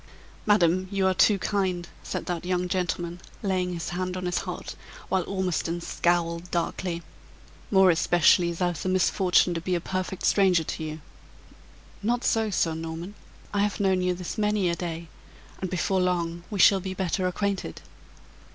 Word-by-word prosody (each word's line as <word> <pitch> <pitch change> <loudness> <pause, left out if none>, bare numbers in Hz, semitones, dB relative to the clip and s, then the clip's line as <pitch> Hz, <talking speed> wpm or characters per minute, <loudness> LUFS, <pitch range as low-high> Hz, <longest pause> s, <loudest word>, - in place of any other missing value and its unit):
"Madam, 185 -3 +3
you 195 -1 0
are 190 - +4
too 200 +2 +4
kind," 185 -3 -1
said - - -4
that 175 -2 -3
young 180 0 0
gentleman, 175 -1 -2 0.2
laying 185 -2 0
his 165 -2 -4
hand 180 +1 -3
on 185 - -4
his 180 0 0
heart, - - -6 0.3
while 190 -1 +1
Ormiston 180 -3 -1
scowled 170 0 0
darkly 170 0 -2 0.7
"more 190 -2 +6
especially 175 +1 +4
as 170 +1 -5
I've 175 -4 -1
the 185 - -1
misfortune 185 -1 +3
to 165 - -3
be 180 +1 -1
a - - +1
perfect 185 +1 -3
stranger 185 -4 +4
to 160 - -5
you." 155 0 -5 1.0
"Not 240 +4 0
so, 225 -1 +2
Sir 165 -4 +1
Norman. 165 +4 -6 0.4
I 205 - +1
have 205 0 0
known 190 -2 +2
you 180 0 +1
this 180 +5 -5
many 210 -3 +2
a - - -1
day; 170 -1 -5 0.5
and 185 - -2
before 185 +1 0
long 175 -1 -1
we 205 - -4
shall 195 +1 +6
be 190 0 -5
better 185 0 0
acquainted. 195 - -3
180 Hz, 170 wpm, -26 LUFS, 170-190 Hz, 1.0 s, more